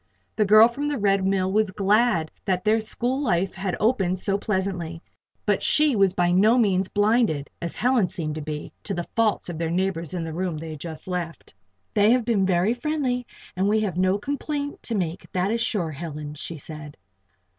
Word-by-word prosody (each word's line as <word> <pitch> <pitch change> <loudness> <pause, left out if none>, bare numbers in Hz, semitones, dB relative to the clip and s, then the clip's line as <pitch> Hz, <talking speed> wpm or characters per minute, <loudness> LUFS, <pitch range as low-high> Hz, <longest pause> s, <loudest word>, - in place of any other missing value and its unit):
The 215 - +2
girl 215 +3 +8
from 280 +5 -4
the 295 -1 -1
Red 195 -3 +2
Mill 190 -1 +1
was 215 0 +2
glad 200 -3 +2
that 185 -1 0
their 220 +1 +3
school 245 +5 -1
life 190 -7 0
had 190 -1 -3
opened 195 -5 +1
so 195 +1 0
pleasantly; 190 -5 -2 0.5
but - - +1
she 300 -4 +4
was 195 -2 +4
by 175 -1 +1
no 210 +7 +4
means 195 -5 +2
blinded 205 - +1
as 170 - -4
Helen 245 -5 +2
seemed 155 -3 -4
to 155 - -5
be 150 0 -6
to 200 - -2
the 175 0 -3
faults 225 -2 +1
of 170 -3 -5
their 165 -1 -1
neighbors 175 -2 -1
in 170 - -2
the 160 -1 -5
room 175 -1 -2
they 160 +1 -6
had 155 - -8
just 160 +2 -8
left. 175 -4 -5 0.4
"They 205 0 +4
have 250 -2 +1
been 205 -5 +2
very 185 +4 +2
friendly 250 -2 -2 0.3
and 190 +2 +1
we 215 +1 +2
have 195 -6 -2
no 185 +2 +2
complaint 285 +4 -4
to 230 - -4
make, 175 -3 -3
that 185 +2 0
is 230 0 0
sure, 185 -9 -1
Helen," 150 -1 -6
she 155 +2 -7
said. 150 0 -10
190 Hz, 200 wpm, -24 LUFS, 170-220 Hz, 0.5 s, girl